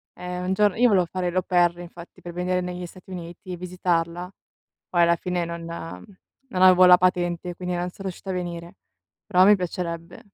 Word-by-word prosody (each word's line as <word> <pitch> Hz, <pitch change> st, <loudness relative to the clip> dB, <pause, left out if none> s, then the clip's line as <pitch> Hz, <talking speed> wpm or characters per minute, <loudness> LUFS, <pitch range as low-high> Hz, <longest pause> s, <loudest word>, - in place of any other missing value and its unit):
Ehm, 180 Hz, 0 st, -5 dB
un 190 Hz, -, 0 dB
giorn 205 Hz, -1 st, +2 dB
io 245 Hz, +1 st, +5 dB
volevo 190 Hz, -5 st, +3 dB
fare 180 Hz, +1 st, -3 dB
l' -, -, -10 dB
au 185 Hz, -, +2 dB
pair 175 Hz, -2 st, +2 dB
infatti 175 Hz, 0 st, -12 dB
per 175 Hz, -1 st, -8 dB
venire 180 Hz, +1 st, -1 dB
negli 180 Hz, 0 st, -5 dB
Stati 185 Hz, +2 st, -15 dB
Uniti 175 Hz, +1 st, -8 dB
e -, -, -3 dB
visitarla, 175 Hz, -1 st, -2 dB, 0.6 s
poi 175 Hz, -1 st, +3 dB
alla 170 Hz, 0 st, +4 dB
fine 175 Hz, 0 st, -2 dB
non 170 Hz, 0 st, -6 dB, 0.8 s
non 185 Hz, -6 st, -3 dB
avevo 185 Hz, 0 st, +8 dB
la 180 Hz, 0 st, +9 dB
patente, 175 Hz, -1 st, 0 dB
quindi 180 Hz, -1 st, -4 dB
non 175 Hz, +1 st, -2 dB
sono 195 Hz, +2 st, -11 dB
riuscita 190 Hz, +2 st, -7 dB
a -, -, -2 dB
venire, 175 Hz, -1 st, -5 dB, 0.5 s
però 185 Hz, -3 st, +5 dB
mi 210 Hz, +1 st, +7 dB
piacerebbe. 170 Hz, -2 st, -5 dB
180 Hz, 195 wpm, -24 LUFS, 175-185 Hz, 0.8 s, la